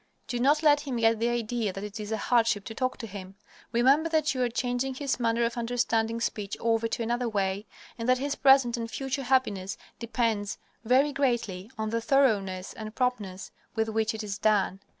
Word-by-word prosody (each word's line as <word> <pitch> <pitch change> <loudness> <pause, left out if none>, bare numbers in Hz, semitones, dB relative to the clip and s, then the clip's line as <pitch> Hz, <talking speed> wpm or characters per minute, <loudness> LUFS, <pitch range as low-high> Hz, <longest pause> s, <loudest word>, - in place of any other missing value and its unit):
Do 245 - -2
not 290 +5 +3
let 295 -1 +6
him 275 -4 -4
get 225 -1 +3
the 235 +1 +1
idea 235 -2 -1
that 195 +2 -7
it 210 +1 -6
is 210 0 -5
a 220 - 0
hardship 225 -3 +2
to 225 - -6
talk 255 +2 -1
to - - -6
him. 195 -2 -9 0.4
Remember 270 +7 +4
that 310 -3 +2
you 255 - -2
are 245 - +2
changing 245 +2 -1
his 275 -1 -2
manner 230 0 +1
of 235 +1 -3
understanding 230 -1 0
speech 210 -3 -3
over 230 0 +1
to 230 - -2
another 240 +1 -1
way, 200 0 -1 0.3
and 230 +2 -2
that 255 - +5
his 280 +2 -2
present 265 -4 +5
and 230 -1 -4
future 270 +3 -3
happiness 245 -8 0 0.2
depends 225 -3 -1 0.3
very 265 +5 +3
greatly 230 -8 -1
on 220 0 -2
the 230 0 0
thoroughness 205 -9 +1
and 215 0 -8
promptness 215 -7 -2 0.2
with 220 0 0
which 220 +1 0
it 220 - -5
is 205 -1 -5
done. 205 -3 +2
230 Hz, 200 wpm, -28 LUFS, 215-255 Hz, 0.4 s, let